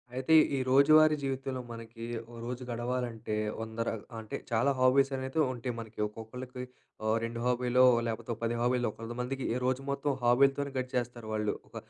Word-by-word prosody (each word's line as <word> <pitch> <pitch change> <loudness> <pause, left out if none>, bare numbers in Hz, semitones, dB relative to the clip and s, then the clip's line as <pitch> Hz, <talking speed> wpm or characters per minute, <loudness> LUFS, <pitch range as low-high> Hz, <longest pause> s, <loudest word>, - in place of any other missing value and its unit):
అయితే 130 +5 +1 0.2
ఈ - - 0
రోజువారీ 155 +3 +6
జీవితంలో 135 -1 -2
మనకి, 115 0 -8 0.3
ఓ - - -13
రోజు 125 +1 -4
గడవాలంటే 120 -2 -3 0.3
100 110 0 -7
ర - - +2 0.3
అంటే 110 -1 -6 0.2
చాలా 120 +5 +3
హాబీస్ 135 +2 +4
అనేటివి 130 +4 0
ఉంటయి. 125 0 -4
మనకి 110 -1 -9
ఒక్కొక్కళ్ళకి 125 +4 -8 0.4
ఆహ్, 110 0 +3
2 115 0 -3
హాబీలో 125 0 +3 0.2
లేకపోతే, 115 +1 -4
ఒ - - -19
10 115 0 0
హాబీలో, 125 0 +2
కొంత 115 +1 -7
మందికి 130 +2 -3 0.2
రోజు 130 +1 +1
మొత్తం 140 +1 0
హాబీలతోనే 135 +3 +3
గడిచేస్తారు 125 -2 -3
వాళ్ళు. 105 -1 0
ఒక - - -20
125 Hz, 160 wpm, -31 LUFS, 115-130 Hz, 0.4 s, రోజువారీ